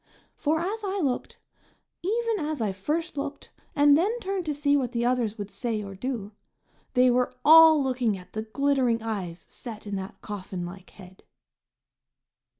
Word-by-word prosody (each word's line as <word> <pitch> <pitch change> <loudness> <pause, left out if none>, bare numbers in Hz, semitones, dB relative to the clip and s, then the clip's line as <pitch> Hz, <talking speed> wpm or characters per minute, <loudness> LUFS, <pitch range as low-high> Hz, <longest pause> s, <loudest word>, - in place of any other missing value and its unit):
For 320 -4 0
as 410 +6 -3
I 395 0 -2
looked, 270 -7 -2 0.6
even 450 +3 0
as 305 -1 -2
I 215 -3 0
first 300 - -3
looked, 280 +1 -5 0.2
and 290 0 +6
then 345 +7 +3
turned 385 -5 -3
to 300 - 0
see 285 0 +2
what 255 -3 0
the 235 0 0
others 240 -4 0
would 205 -1 -6
say 225 -4 -2
or 195 -1 -7
do, 215 0 -4 0.6
they 250 0 +5
were 250 +1 +1
all 320 -1 +8
looking 250 -6 0
at 180 0 -14
the 215 - -2
glittering 245 0 +1
eyes 190 -6 -4
set 220 -4 -8
in 205 -1 -3
that 190 0 -7
coffin 190 -3 -5
like 180 +1 -10
head. 190 -1 -15
250 Hz, 165 wpm, -26 LUFS, 210-305 Hz, 0.6 s, all